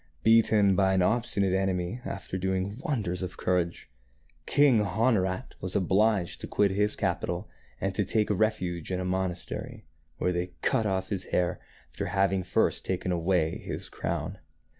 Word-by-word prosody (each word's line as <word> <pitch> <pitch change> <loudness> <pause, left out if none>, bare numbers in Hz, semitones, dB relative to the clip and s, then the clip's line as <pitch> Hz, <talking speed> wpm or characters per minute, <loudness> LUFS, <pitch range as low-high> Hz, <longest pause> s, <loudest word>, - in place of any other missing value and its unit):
Beaten 110 -3 +5
by 95 -1 +3
an 95 - +3
obstinate 100 -3 +1
enemy 95 +3 -1
after 95 -1 -5
doing 95 +3 -1
wonders 110 - -2
of 90 -2 -5
courage, 90 -2 -1 0.6
King 140 -6 +5
Honorat 105 -4 0
was 95 0 -2
obliged 100 0 +2
to - - -5
quit 100 -2 +2
his 105 +2 +1
capital 90 0 -2 0.3
and 95 0 -1
to 105 - +1
take 105 +2 +1
refuge 95 -5 0
in 90 - -1
a 95 - -2
monastery, 90 -1 -3 0.3
where 90 - +1
they 90 0 -3
cut 110 - +2
off 95 -1 -1
his 95 -3 -2
hair, 90 -1 0 0.3
after - - -4
having 95 -1 +2
first 90 - +1
taken 90 0 -2
away 85 -2 +1
his - - -6
crown. - - -3
95 Hz, 155 wpm, -28 LUFS, 90-105 Hz, 0.6 s, Beaten